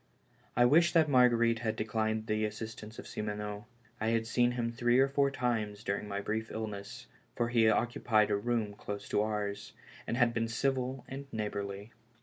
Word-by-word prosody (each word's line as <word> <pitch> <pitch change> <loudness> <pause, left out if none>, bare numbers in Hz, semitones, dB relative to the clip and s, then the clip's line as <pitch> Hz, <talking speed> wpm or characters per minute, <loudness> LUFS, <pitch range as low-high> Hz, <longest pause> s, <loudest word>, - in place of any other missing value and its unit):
I 120 - +6
wished 170 +7 +4
that 160 -2 +6
Marguerite 120 -3 +4
had 110 -2 -1
declined 110 0 -1
the 110 0 0
assistance 110 0 -5
of - - -8
Simoneau. 105 +1 -5 0.3
I 110 - -1
had 115 0 +1
seen 120 +1 +2
him 120 -1 -1
three 120 +1 +2
or 135 +1 +5
four 140 0 +2
times 110 -5 -2
during 100 +1 -2
my 100 0 -3
brief 110 +2 -2
illness, 110 +2 -6 0.3
for 120 -1 0
he 115 -2 +4
oc 120 +2 +2
cupied 110 -4 +2
a - - +3
room 110 -1 -1
close 100 0 -6
to - - +2
ours, 105 -1 -3 0.3
and 120 - -1
had 120 -2 +3
been 115 0 0
civil 130 +1 -1
and 135 +1 -8
neighborly. 100 -1 -4
110 Hz, 180 wpm, -32 LUFS, 105-120 Hz, 0.3 s, I